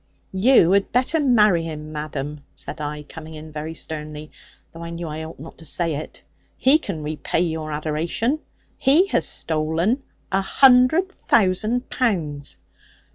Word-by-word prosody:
'You 190 -2 +5
had 200 0 +2
better 260 +7 +2
marry 215 - +4
him, 155 -1 -6
madam,' 150 -1 -5
said - - -5
I, 150 0 -4
coming 160 +1 -10
in 155 +1 -10
very 155 +2 -5
sternly; 155 -1 -7 0.4
though 165 - -10
I 170 - -6
knew 170 0 -5
I 155 +1 -5
ought 160 - -10
not 160 +3 -11
to 165 - -11
say 165 +2 0
it: 150 +2 -7 0.3
'he 275 +4 +5
can 155 - -5
repay 155 +2 -1
your 160 -3 -2
adoration. 160 - -1 0.4
He 295 +8 +5
has - - +1
stolen 160 - 0 0.3
a 195 0 +2
hundred 265 - +5 0.2
thousand 215 +4 +2
pounds.' 160 - -1
165 Hz, 150 wpm, -22 LUFS, 155-225 Hz, 0.4 s, You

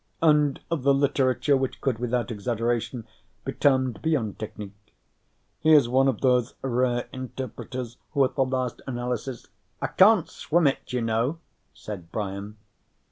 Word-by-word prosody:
_ - - +5
"and 150 -2 +4
of 165 -4 0
the 140 +1 +4
literature 140 0 +2
which 130 -1 -2
could, 130 -5 -1
without 125 -1 -1
exaggeration, 115 +2 -2 0.4
be - - -2
termed 130 -6 +2
beyond 135 -11 -1
technique. 105 -1 -9 0.6
He 160 0 +4
is 140 -5 +6
one 130 +2 +3
of 130 -6 0
those 125 -2 +2
rare 125 -1 0
interpreters 130 -1 -6 0.2
who 140 -3 +4
at 130 - -3
the 135 - +2
last 130 -2 -2
analysis 125 0 -4 0.2
" - - -44
"I - - -2
can't 195 -2 +5
swim 170 +1 0
it, 135 - 0
you 125 -1 -1
know," 115 +7 0 0.4
said 90 -6 -8
Brian. 100 0 -4
125 Hz, 155 wpm, -26 LUFS, 115-135 Hz, 0.6 s, is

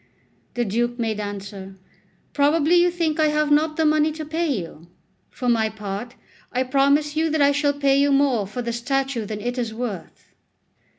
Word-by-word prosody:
The 240 0 0
Duke 240 +4 -1
made 225 -3 -2
answer: 200 -1 -7 0.6
"Probably 300 +3 +2
you 350 0 +5
think 335 -3 -1
I 310 - +4
have 300 0 +1
not 310 +1 +2
the 320 - +2
money 305 0 +3
to 310 0 -6
pay 325 +3 -1
you. 170 - -4 0.4
For 250 - -5
my 225 -2 +2
part, 215 +3 -6 0.4
I 255 +1 0
promise 280 +3 +2
you 320 +1 +1
that 315 0 0
I 280 - +5
shall 285 0 +1
pay 280 -1 +2
you 285 0 +3
more 270 -7 +2
for 240 +5 -5
the 235 0 -3
statue 265 -1 -1
than 210 0 -5
it 245 +2 -3
is 225 -2 -3
worth." 225 -6 -7
270 Hz, 185 wpm, -22 LUFS, 225-300 Hz, 0.6 s, you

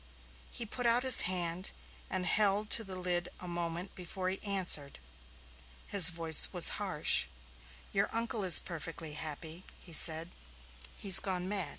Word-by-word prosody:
He 235 - -8
put 240 +3 -6
out 235 +2 0
his 260 -1 +4
hand 180 0 -3 0.4
and 185 -1 -6
held 205 +2 -2
to 225 - +1
the 190 -3 -11
lid 180 -1 -4
a 180 - -12
moment 175 +1 -7
before 185 +1 -9
he 190 - -8
answered. 185 -8 -2 0.9
His 185 -4 +7
voice 165 -2 -1
was - - +3
harsh. - - -1 0.7
"Your - - -3
uncle 230 -2 -6
is 180 -4 +11
perfectly 165 -2 -10
happy," 160 +3 -10 0.2
he 170 - -15
said. 165 +2 +2 0.7
"He's 190 -2 +7
gone 185 -2 -7
mad." 195 -2 -3
180 Hz, 150 wpm, -28 LUFS, 165-195 Hz, 0.9 s, is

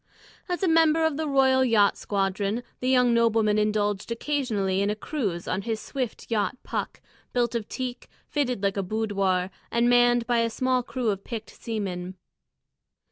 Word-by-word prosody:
As 355 +1 -2
a - - +3
member 325 -1 +4
of 320 -2 +1
the 315 +1 -2
Royal 265 -2 +4
Yacht 215 -5 +4
Squadron, 200 +3 -1 0.2
the 255 - -1
young 250 -2 +4
nobleman 225 -2 +3
indulged 210 0 0
occasionally 230 -8 -1
in 200 - +1
a 210 - 0
cruise 215 - -3
on 185 - -1
his 220 +1 -3
swift 255 -3 -5
yacht 215 +2 0
Puck, - - -4 0.3
built 240 -1 +1
of 230 -3 -3
teak, 255 -1 -5 0.2
fitted 250 -8 -1
like 200 0 +1
a - - +1
boudoir, 195 -2 0 0.2
and 235 +1 +2
manned 240 -1 +4
by 240 0 +2
a 230 0 +2
small 255 +2 +1
crew 245 -2 -1
of 195 -1 -5
picked 225 -2 -6
seamen. 190 -5 -4
230 Hz, 170 wpm, -26 LUFS, 205-255 Hz, 0.3 s, member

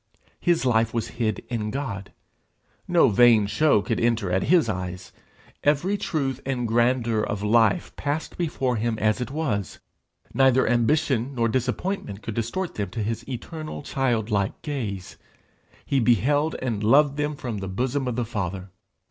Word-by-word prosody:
His 175 -5 +1
life 115 -2 +2
was 115 0 -1
hid 115 -2 -2
in 110 -3 -2
God. 105 -6 -5 0.8
No 175 -6 +5
vain 115 0 +5
show 105 0 +3
could - - -1
enter 115 -5 +1
at 95 +1 +1
his 170 -6 +4
eyes; 90 -2 -4 0.5
every 150 +7 +2
truth 140 -9 -2
and 125 -3 -2
grandeur 120 -1 +2
of 105 -1 -3
life 110 -1 +2
passed 145 +2 -3
before 135 -7 -1
him 115 +1 -1
as 110 +3 +1
it 125 - -3
was; 135 - -2 0.6
neither 130 -1 +4
ambition 125 +1 +1
nor 115 -2 +2
disappointment 125 - -2
could 110 - -4
distort 120 - -3
them 100 -3 -3
to 110 +3 -3
his 115 +3 -4
eternal 155 +5 -6
childlike 110 -8 0
gaze; 110 -11 -4 0.7
he 140 - +1
beheld 140 - +2
and 110 -5 -2
loved 140 +5 +5
them 150 0 -1
from 120 -6 -5
the 95 - -5
bosom 130 +7 -1
of 125 - -2
the 120 0 -1
Father. 95 -4 -4
120 Hz, 155 wpm, -25 LUFS, 105-140 Hz, 0.8 s, No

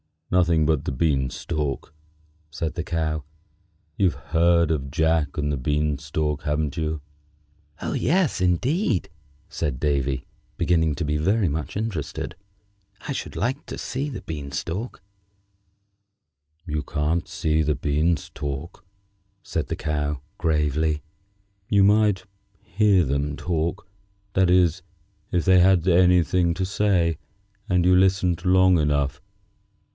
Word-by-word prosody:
"Nothing 85 -3 +3
but 75 -2 +1
the - - -1
bean 65 -2 +1
stalk," 75 -1 -4 0.6
said 80 +1 -3
the 85 - -4
Cow. 80 -3 -1 0.7
"You've 95 -5 +2
heard 85 0 +2
of 70 -4 -2
'Jack 80 0 +1
and 75 -1 0
the 70 - -1
Bean 75 +2 0
stalk,' 75 0 -2
haven't 75 0 -1
you?" 80 -1 -2 0.8
"Oh! - - -2
yes, 175 - +1
indeed!" 110 - +1 0.4
said 70 -7 -3
Davy, 70 -2 0 0.3
beginning 80 -4 +2
to 85 - -3
be 75 +1 0
very 95 +5 +2
much 75 +1 -4
interested. 85 - -3 0.7
"I - - -2
should 135 - -5
like 130 +5 -2
to - - -6
see 135 +3 -3
the 120 -10 -6
bean 75 -6 -6
stalk." 90 - -4 1.6
"You 75 -3 -2
can't 75 +3 -1
see 80 0 0
the 75 -1 +1
beans 75 +2 0
talk," 75 +6 -6 0.6
said 80 - -3
the - - -2
Cow, 75 -2 -2 0.2
gravely. 75 -1 0 0.7
"You 100 -2 +4
might 105 -1 +3 0.4
hear 100 0 +3
them 70 +1 -1
talk; 85 +1 -2 0.5
that 95 -1 +3
is, 90 -3 +3 0.5
if 90 -2 +2
they 95 -1 +6
had 90 -1 +4
anything 90 -1 +4
to 95 +1 -1
say, 90 -5 +1 0.5
and 90 -2 +2
you 90 0 +5
listened 90 -2 +2
long 95 -1 +5
enough. 70 -2 0
80 Hz, 130 wpm, -24 LUFS, 75-90 Hz, 1.6 s, they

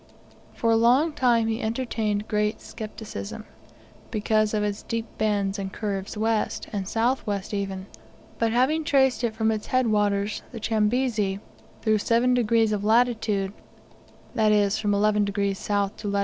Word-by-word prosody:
For 230 - +1
a - - +5
long 250 +8 +4
time 240 -5 +3
he 225 +2 -1
entertained 220 -3 -2
great 210 0 0
scepticism, 220 0 -7 0.6
because 215 -1 +1
of 210 - +1
its 205 0 -2
deep 230 -1 -3
bends 205 -2 0
and 190 -1 -4
curves 200 -1 -4
west, 220 0 -1
and 195 -2 -3
south 235 +4 0
west 200 0 -3
even; 195 -2 -3 0.5
but 230 -1 +2
having 265 +7 +2
traced 265 -5 +2
it 225 -2 0
from 220 0 +1
its 215 -1 -3
head 255 0 +2
waters, 205 -1 +1
the 230 - -7
Chambezi, 215 -2 0 0.4
through 215 -1 +3
7 235 +4 +2
degrees 230 -2 +3
of 205 -1 -1
latitude 220 -3 +2 0.8
that 220 -3 +3
is, 205 0 +2
from 205 -1 +1
11 210 0 +3
degrees 200 -1 -2
S. 200 -1 +1
to 210 - -6
lat. 200 0 0
215 Hz, 160 wpm, -25 LUFS, 205-230 Hz, 0.8 s, a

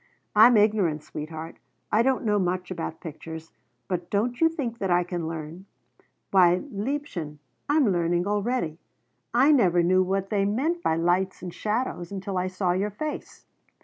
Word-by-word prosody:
I'm 220 +2 +8
ignorant, 200 -8 +2
sweetheart, 155 +1 -7 0.3
I 215 - +4
don't 260 0 +1
know 210 -1 +2
much 180 0 -2
about 165 -2 -5
pictures, 160 0 -8 0.4
but 180 -2 -3
don't 235 +6 -1
you 325 - +6
think 250 -8 -4
that 195 - -1
I 175 0 +3
can 175 -2 -4
learn? 165 +3 -7 0.6
Why, 180 -2 +5
liebchen, 205 - -4 0.3
I'm 290 -3 +4
learning 175 0 +1
already! 205 -5 -1 0.5
I 260 +6 +5
never 180 - +4
knew 185 +2 +4
what 195 +1 -1
they 200 -2 +2
meant 275 +13 0
by 160 - +1
lights 180 +4 0
and 180 -2 -6
shadows 210 -5 -2
until 195 -1 -3
I 180 - -1
saw 185 -1 -1
your 190 +4 0
face. 300 +9 -6
190 Hz, 160 wpm, -26 LUFS, 175-220 Hz, 0.6 s, I'm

